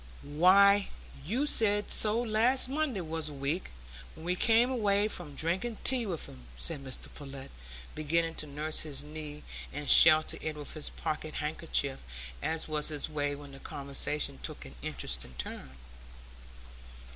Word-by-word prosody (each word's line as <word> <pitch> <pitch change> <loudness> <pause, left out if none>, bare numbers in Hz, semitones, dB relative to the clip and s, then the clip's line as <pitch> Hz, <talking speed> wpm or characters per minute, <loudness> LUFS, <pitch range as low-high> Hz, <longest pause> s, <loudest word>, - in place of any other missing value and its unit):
"Why, 195 +7 +4 0.4
you 245 - -1
said 205 -7 +2
so 215 +1 +4
last 240 +3 +2
Monday 275 -7 -2
was 160 -1 -4
a - - -9
week, 140 +6 -3 0.5
when 160 - -12
we 180 +1 0
came 230 +6 +2
away 205 -4 +1
from 170 -8 -4
drinking 190 +10 -2
tea 250 -4 +5
with 170 -5 -4
'em," 65 -2 -14
said 145 - -2
Mr 130 -2 -8
Pullet, 135 -2 -10 0.4
beginning 165 +2 -1
to 150 - -9
nurse 150 +2 -2
his 145 -3 +2
knee 150 0 -9 0.3
and 145 +1 -7
shelter 155 -1 +8
it 155 -1 -4
with 150 -1 -6
his 155 -2 -1
pocket 155 0 -5
handkerchief, 150 -3 -1 0.4
as 160 +1 +1
was 150 -1 -1
his 150 -1 -1
way 145 -1 -2
when 145 -1 -12
the 135 - -12
conversation 140 - -3
took - - -6
an - - -12
interesting 65 - -4
turn. 65 +1 -6
155 Hz, 155 wpm, -30 LUFS, 145-200 Hz, 0.5 s, shelter